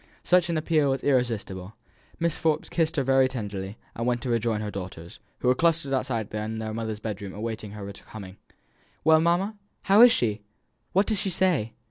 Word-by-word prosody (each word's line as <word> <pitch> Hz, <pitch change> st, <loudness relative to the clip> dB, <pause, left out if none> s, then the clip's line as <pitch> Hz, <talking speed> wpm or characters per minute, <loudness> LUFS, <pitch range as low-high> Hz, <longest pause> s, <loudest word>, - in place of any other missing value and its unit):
Such 180 Hz, -1 st, +3 dB
an 165 Hz, -, 0 dB
appeal 155 Hz, -2 st, +2 dB
was 135 Hz, -1 st, -1 dB
irresistible. 110 Hz, -8 st, -1 dB, 0.4 s
Mrs. 170 Hz, -2 st, 0 dB
Forbes 155 Hz, -1 st, 0 dB
kissed 165 Hz, -1 st, 0 dB
her 140 Hz, -, +1 dB
very 135 Hz, 0 st, +4 dB
tenderly, 105 Hz, -5 st, -5 dB, 0.2 s
and 115 Hz, +1 st, -3 dB
went 120 Hz, -1 st, 0 dB
to 125 Hz, -, -2 dB
rejoin 115 Hz, -2 st, +1 dB
her 105 Hz, -1 st, -4 dB
daughters, 90 Hz, -3 st, -8 dB, 0.2 s
who -, -, 0 dB
were 125 Hz, -, +6 dB
clustered 165 Hz, 0 st, +1 dB
together 115 Hz, -6 st, -1 dB
in 110 Hz, +1 st, -4 dB
their 110 Hz, -1 st, -4 dB
mother's 110 Hz, -1 st, -4 dB
bedroom 100 Hz, -3 st, -5 dB
awaiting 110 Hz, -1 st, -5 dB
her 100 Hz, -1 st, -7 dB
coming. 100 Hz, -1 st, -11 dB, 0.7 s
"Well, 160 Hz, 0 st, +6 dB
mamma, 185 Hz, +6 st, +1 dB, 0.2 s
how 200 Hz, +3 st, +6 dB
is 245 Hz, 0 st, +10 dB
she? 110 Hz, -, 0 dB, 0.5 s
What 195 Hz, +3 st, +4 dB
does 215 Hz, -2 st, +1 dB
she 195 Hz, -, -1 dB
say?" 170 Hz, -, +1 dB
120 Hz, 185 wpm, -26 LUFS, 105-160 Hz, 0.7 s, is